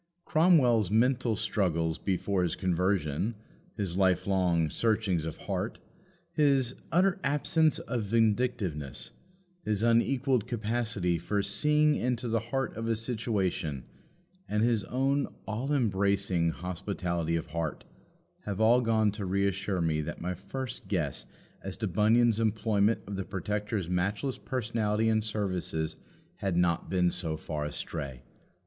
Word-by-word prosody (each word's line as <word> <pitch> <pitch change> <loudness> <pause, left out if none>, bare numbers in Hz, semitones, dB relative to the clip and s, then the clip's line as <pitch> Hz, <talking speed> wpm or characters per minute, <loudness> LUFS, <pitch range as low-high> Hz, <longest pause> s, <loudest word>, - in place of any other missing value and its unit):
Cromwell's 135 - +4
"mental 120 +1 +2
struggles 90 -6 0
before 95 0 0
his 85 -3 0
conversion," 90 +1 0 0.4
his 95 -4 -2
life 95 -2 +3
long 90 -4 +2
"searchings 105 -8 +1
of 80 - -6
heart," 100 +3 -3 0.5
his 140 -6 +3 0.2
"utter 185 +2 +3
absence 150 +3 +2
of 115 -2 -3
vindictiveness," 105 - 0 0.5
his 105 -3 0
unequalled 125 +1 +2
capacity 105 -6 -1
for 100 +4 -1
"seeing 150 +10 +3
into 125 -3 -1
the 115 0 +1
heart 130 +3 -3
of 115 +1 -3
a 115 - +2
situation," 105 - -2 0.6
and 105 +1 +1
his 115 -3 +2
own 135 +5 +1 0.2
"all 120 +6 -2
embracing 100 - +2
hospitality 85 -1 -2
of 80 - -2
heart" 80 -2 -3 0.7
all 115 +3 +5
have - - -1
gone 110 -2 +3
to 105 0 -5
reassure 100 0 0
me 80 -2 +1
that 80 +2 -5
my 90 +2 -2
first 125 +7 -6
guess - - -1 0.4
as 95 -1 -5
to 105 +1 -2
Bunyan's 110 +4 +3
employment 110 -1 +2
of 100 0 -5
the 95 - -2
Protector's 105 +1 -3
matchless 100 +9 -1
personality 110 -3 0
and 110 -1 +2
services 90 -7 -2 0.4
had 95 -3 -1
not 85 -2 +1
been 90 -2 +2
so 80 -3 -2
far 75 -1 -4
astray. 70 -4 -5
105 Hz, 130 wpm, -29 LUFS, 90-115 Hz, 0.7 s, all